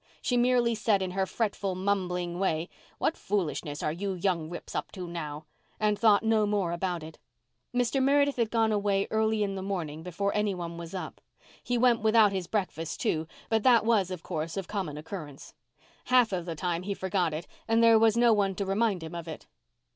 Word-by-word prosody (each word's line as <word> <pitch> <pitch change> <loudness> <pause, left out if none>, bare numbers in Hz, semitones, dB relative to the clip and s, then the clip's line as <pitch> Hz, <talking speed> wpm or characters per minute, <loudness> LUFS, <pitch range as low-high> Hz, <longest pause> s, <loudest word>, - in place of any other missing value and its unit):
She 250 - -1
merely 245 -1 +3
said 215 -3 +1
in 185 - -3
her 190 +1 -1
fretful 200 -4 -2
mumbling 180 -2 -1
way, 170 -3 0 0.3
"What 320 - 0
foolishness 160 -7 -2
are 150 - +1
you 190 +4 -3
young 175 -3 -1
rips 175 - -8
up - - -3
to 185 -3 -6
now?" 155 -3 -6 0.3
and 210 -1 +1
thought 215 -2 +5
no 220 -1 +3
more 200 -4 0
about 175 -1 -2
it. 160 +1 -11 0.5
Mr. 245 +2 +1
Meredith 280 +1 +3
had 230 -3 +1
gone 225 -1 +2
away 200 -1 +1
early 220 -1 +2
in 200 -1 -2
the 190 - -4
morning 170 -6 -4
before 180 +4 -2
any 210 -2 0
one 170 -1 -5
was 170 +2 -7
up. 185 - -6 0.4
He 245 - 0
went 240 -1 +4
without 220 -1 +5
his 190 -3 -3
breakfast, 165 -6 -3
too, 160 0 0 0.2
but 225 -1 +1
that 235 -1 +5
was, 215 -5 +3
of 180 -3 -6
course, 160 0 -4
of 195 - -3
common 185 -8 -3
occurrence. 150 -3 -8 0.5
Half 250 -3 +4
of 180 -1 -3
the 165 - -3
time 175 +1 -2
he 200 +2 -3
forgot 185 -3 0
it 155 +3 -4 0.2
and 225 0 +3
there 230 -1 +7
was 225 0 +4
no 235 -1 +5
one 195 -2 +1
to 200 - -2
remind 195 -2 0
him 160 +1 -7
of 170 -1 -6
it. 160 - -8
195 Hz, 205 wpm, -28 LUFS, 170-220 Hz, 0.5 s, there